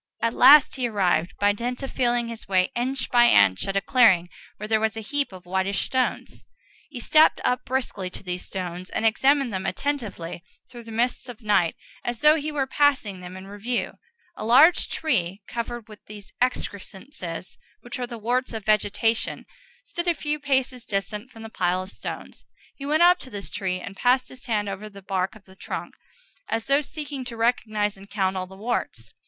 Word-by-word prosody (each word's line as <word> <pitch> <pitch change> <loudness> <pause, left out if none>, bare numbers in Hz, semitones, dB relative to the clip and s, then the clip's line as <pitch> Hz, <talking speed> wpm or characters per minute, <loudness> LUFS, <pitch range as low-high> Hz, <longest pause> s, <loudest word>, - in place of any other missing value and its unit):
At 230 +1 0
last 280 +2 +7
he 250 -2 0
arrived, 185 -5 +1
by 205 0 +4
dint 245 +5 -4
of 270 - -5
feeling 240 -2 +1
his 230 -1 -8
way 185 -1 +2
inch 260 +3 -2
by 240 -1 +6
inch, 95 -1 +4
at 195 - -2
a 195 - +2
clearing 190 -10 +4 0.3
where 210 - -6
there 220 0 +2
was 220 0 0
a - - -3
great 210 - -11
heap 290 -4 0
of 185 -1 -12
whitish 190 +2 0
stones. 260 -1 -2 0.5
He 260 - -7
stepped 310 +6 +5
up 250 0 0
briskly 235 -8 -2
to 180 - -9
these 180 -1 -4
stones, 180 -1 -5
and - - -2
examined 265 +2 +3
them 190 0 -2
attentively 200 -10 -3 0.2
through 240 -2 -11
the 225 - -9
mists 245 +3 -1
of 240 -1 -10
night, 200 -6 +2 0.3
as 240 -2 -3
though 300 0 +7
he 310 -1 -2
were 285 -3 0
passing 265 -9 +1
them 180 +1 -8
in 190 - -10
review. 205 +5 -3 0.4
A - - -6
large 275 +10 +6
tree, 195 - -1
covered 235 -1 -5
with 215 -1 -14
those 205 -1 -11
excrescences 200 - -4 0.2
which 250 +2 -7
are 245 - -2
the 240 -1 -7
warts 245 +3 -1
of 220 -3 -6
vegetation, 215 +2 +1 0.4
stood 345 -7 -5
a 345 - +3
few 300 0 -2
paces 265 -3 0
distant 210 +3 -3
from 225 -3 -12
the - - -6
pile 185 -3 0
of 190 - -9
stones. - - -8 0.3
He 280 - -7
went 310 +3 +3
up 355 +1 +6
to 260 - -9
this 205 -4 -7
tree 185 -2 -2
and 195 +2 -8
passed 250 +4 +2
his 255 0 -12
hand 210 -3 0
over 200 +2 -5
the 200 -1 -13
bark 190 +1 -1
of 215 - -16
the 190 - -17
trunk, - - -6 0.6
as 225 0 -1
though 275 +3 +3
seeking 290 -2 -6
to 235 -2 -7
recognize 215 -3 0
and 195 +1 -14
count 190 -2 0
all 185 -1 -3
the 190 +1 -13
warts. 125 - -3
225 Hz, 200 wpm, -25 LUFS, 195-255 Hz, 0.6 s, last